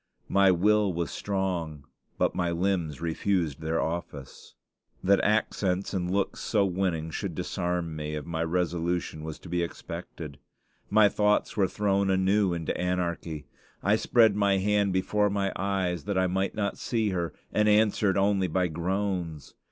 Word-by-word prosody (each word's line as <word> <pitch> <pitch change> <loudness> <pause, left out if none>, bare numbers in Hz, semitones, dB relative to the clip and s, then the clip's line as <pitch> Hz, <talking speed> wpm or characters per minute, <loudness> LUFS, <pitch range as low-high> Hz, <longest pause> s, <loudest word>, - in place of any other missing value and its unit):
My 100 -1 +5
will 105 +3 +3
was 85 -3 -2
strong, 90 -7 -3 0.3
but - - +1
my 90 -1 0
limbs 85 -4 -1
refused 85 -3 -1
their 80 +1 -1
office. 80 -5 -5 0.5
That 100 +1 +4
accents 100 -3 0
and 90 -2 -1
looks 100 +1 -1
so 105 -3 +1
winning 90 -4 -1
should 90 -1 -4
disarm 90 -2 -2
me 75 0 -4
of 75 - -5
my 80 -1 -2
resolution 85 -1 -1
was 80 -1 -6
to - - -13
be 85 0 -1
expected. 85 -4 -7 0.5
My 110 -1 +6
thoughts 105 +1 +1
were 100 -3 +3
thrown 100 -1 +1
anew 95 +1 +3
into 85 -2 -2
anarchy. 85 -4 -2 0.4
I - - +4
spread 110 -4 +4
my 100 -1 +3
hand 100 0 +2
before 105 +3 +1
my 100 -1 -1
eyes 95 -4 -1
that 100 -2 -1
I 95 - +3
might 95 +2 -1
not 100 -2 -2
see 110 -3 0
her, 85 -3 -2 0.2
and 105 0 +3
answered 105 -2 +3
only 100 -1 +2
by 90 +1 0
groans. 85 -2 -3
90 Hz, 155 wpm, -28 LUFS, 85-100 Hz, 0.5 s, My